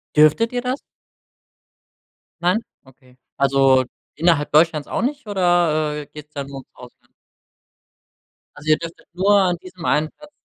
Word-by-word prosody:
Dürftet 155 Hz, +11 st, +4 dB
ihr 245 Hz, -, -1 dB
das? 255 Hz, +2 st, -2 dB, 1.6 s
Nein? 180 Hz, +5 st, +2 dB, 0.2 s
Okay. 130 Hz, -1 st, -22 dB, 0.2 s
Also, 135 Hz, -1 st, +4 dB, 0.3 s
innerhalb 160 Hz, -2 st, +2 dB
Deutschlands 155 Hz, -1 st, +3 dB
auch -, -, -2 dB
nicht 270 Hz, -1 st, -3 dB
oder, 170 Hz, -6 st, +1 dB
äh, -, -, -18 dB
geht's 150 Hz, 0 st, -13 dB
dann 140 Hz, -2 st, -5 dB
nur 140 Hz, 0 st, -8 dB
ums -, -, -16 dB
Ausland? 125 Hz, -1 st, -16 dB, 1.4 s
Also, 150 Hz, +1 st, -7 dB
ihr 155 Hz, -, +5 dB
dürftet 165 Hz, 0 st, -9 dB
nur 200 Hz, +3 st, +3 dB
an 180 Hz, -2 st, +1 dB
diesem 180 Hz, -2 st, -10 dB
einen 150 Hz, +2 st, +1 dB
Platz 300 Hz, 0 st, -16 dB
155 Hz, 145 wpm, -21 LUFS, 145-185 Hz, 1.6 s, ihr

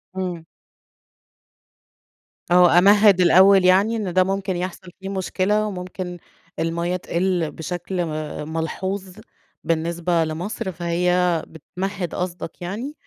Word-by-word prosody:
همم. 180 Hz, -3 st, -4 dB, 2.1 s
آه، 175 Hz, -1 st, +6 dB
أمهِّد 200 Hz, 0 st, +6 dB
الأول 190 Hz, +1 st, +6 dB
يعني 195 Hz, +5 st, +4 dB
إن 205 Hz, -5 st, -3 dB
ده 185 Hz, +1 st, +4 dB
ممكن 195 Hz, 0 st, -2 dB
يحصل 180 Hz, +1 st, -5 dB
فيه 195 Hz, 0 st, -6 dB
مشكلة، 200 Hz, +2 st, 0 dB
وممكن 180 Hz, -2 st, -6 dB, 0.4 s
المَيّة 170 Hz, +2 st, -1 dB
تقِل 175 Hz, -2 st, -1 dB
بشكل 175 Hz, +2 st, -4 dB
م -, -, -5 dB, 0.4 s
ملحوظ 185 Hz, +4 st, -4 dB, 0.5 s
بالنسبة 170 Hz, +1 st, 0 dB
لمصر، 175 Hz, +5 st, -4 dB
فهي 175 Hz, 0 st, +1 dB
بتمهد 180 Hz, +3 st, -5 dB
قصدك 180 Hz, -1 st, -5 dB
يعني، 220 Hz, +11 st, -5 dB
180 Hz, 105 wpm, -22 LUFS, 170-190 Hz, 2.1 s, آه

